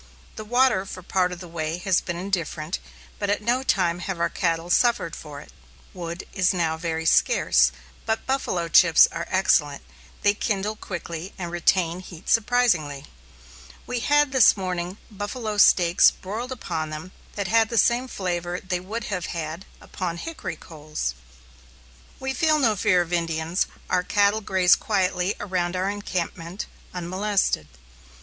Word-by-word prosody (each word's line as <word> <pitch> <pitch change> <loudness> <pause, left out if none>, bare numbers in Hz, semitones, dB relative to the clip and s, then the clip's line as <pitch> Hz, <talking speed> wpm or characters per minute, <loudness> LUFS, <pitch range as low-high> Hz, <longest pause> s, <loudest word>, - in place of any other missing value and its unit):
The 215 - -6
water 245 -2 +3
for 185 - -8
part 180 0 +1
of 180 0 -7
the 180 - -8
way 165 0 -3
has 185 0 +1
been 175 -1 -4
indifferent, 175 -3 -3 0.4
but 205 - -2
at 205 - +1
no 240 +3 +1
time 180 -9 +1
have 180 -1 -4
our 170 0 +1
cattle 165 +1 -1
suffered 225 -9 +2
for 145 -2 -9
it. - - -15 0.4
Wood 170 0 -6
is 190 -1 +2
now 165 -2 0
very 160 0 -3
scarce, 65 - +4 0.4
but 220 0 -1
"buffalo 225 -10 -1
chips" 165 -1 +7
are 165 0 -5
excellent; 150 -6 +2 0.4
they 205 - +5
kindle 210 0 -2
quickly 175 -3 -7
and 175 -3 -5
retain 175 0 +1
heat 175 -3 -10
surprisingly. 205 - +2 0.8
We 250 0 -2
had 290 +3 +3
this 260 -5 +6
morning 180 0 -3
buffalo 210 +1 -4
steaks 175 -2 +6
broiled 225 +7 -6
upon 160 -10 -4
them 155 +4 -7 0.2
that 200 -2 -2
had 225 +1 +4
the 235 - -2
same 240 +3 +3
flavor 180 -5 -3
they 185 -1 -3
would 215 +6 -5
have 185 -5 -3
had 165 +2 -5
upon 175 -3 -5
hickory 330 - -5
coals. 150 - -5 1.1
We 265 0 -2
feel 310 +3 +3
no 235 -7 +3
fear 185 -3 +3
of 175 +1 -8
Indians, 165 +1 0 0.2
our 180 - +2
cattle 205 +3 +2
graze 185 -3 +4
quietly 185 -2 0
around 180 -3 -2
our 190 +2 0
encampment 185 -2 -4 0.3
unmolested. 185 - -1
185 Hz, 155 wpm, -24 LUFS, 170-210 Hz, 1.1 s, chips